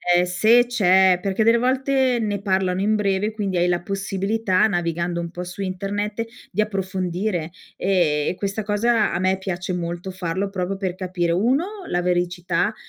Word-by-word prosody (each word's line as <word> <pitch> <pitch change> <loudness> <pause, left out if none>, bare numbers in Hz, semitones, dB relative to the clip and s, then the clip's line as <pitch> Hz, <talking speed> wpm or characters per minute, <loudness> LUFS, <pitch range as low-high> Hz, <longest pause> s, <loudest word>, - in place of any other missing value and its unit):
ehm, 175 - +4
se 220 +7 +4
c'è 190 -5 +4
perché 195 +2 0
delle 230 +1 +5
volte 260 0 +1
ne 205 -2 -2
parlano 190 -2 0
in 210 +2 +2
breve, 205 0 0
quindi 200 -4 -2
hai 175 +1 +2
la 175 -1 +1
possibilità, 195 +1 0
navigando 170 -2 -1
un 170 -1 -4
po' 180 0 -6
su 180 +2 -7
internet, 205 +3 -3 0.2
di 200 - 0
approfondire 185 -3 -2 0.2
e 170 -6 +1
e - - -3
questa 200 +2 -3
cosa 215 +2 +2
a - - -1
me 190 +1 +1
piace 185 -1 -4
molto 175 +1 -4
farlo, 185 +2 -3
proprio 195 0 -3
per 190 -2 -3
capire: 180 -2 -1
1 250 - +2 0.2
la 175 - 0
veridicità 175 +2 0
190 Hz, 170 wpm, -22 LUFS, 180-210 Hz, 0.2 s, delle